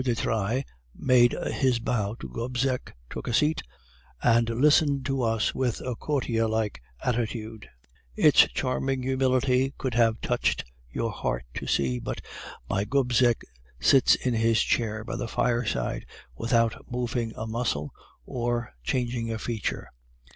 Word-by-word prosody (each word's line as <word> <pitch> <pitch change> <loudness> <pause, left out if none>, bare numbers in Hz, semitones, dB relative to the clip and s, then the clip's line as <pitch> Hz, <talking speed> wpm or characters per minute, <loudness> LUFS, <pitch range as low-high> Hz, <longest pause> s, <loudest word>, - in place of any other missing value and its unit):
de 125 -2 +1
Trailles 115 +4 0 0.3
made 125 -2 +4 0.2
his 130 -3 +2
bow 110 -2 -1
to - - -8
Gobseck, 125 - -2
took - - -7
a 120 - -1
seat, 155 +1 +2 0.6
and 115 0 +4
listened 140 +2 +3
to 135 -1 0
us 115 -2 +1
with 125 -3 -1
a 125 -2 -3
courtier 120 -5 0
like 110 - -1 0.2
attitude; 115 -2 -3 0.5
its - - +6
charming 130 - -1
humility 130 0 +2
would 130 -3 -1
have 115 -1 +3
touched 65 -1 0 0.2
your - - -2
heart - - -3
to - - -5
see, 65 -3 +1
but - - -4 0.5
my 100 +1 0
Gobseck 125 0 +2 0.4
sits 130 - +5
in 125 - -1
his 115 0 +3
chair 110 -2 0
by 115 - -5
the 120 - -3
fireside 115 - -1 0.3
without 115 - +1
moving 120 -2 -2
a 110 - -4
muscle, 110 -11 -2 0.3
or 120 -1 -2
changing 120 - -1
a 110 - -2
feature. 110 -1 -3
120 Hz, 140 wpm, -27 LUFS, 110-130 Hz, 0.6 s, its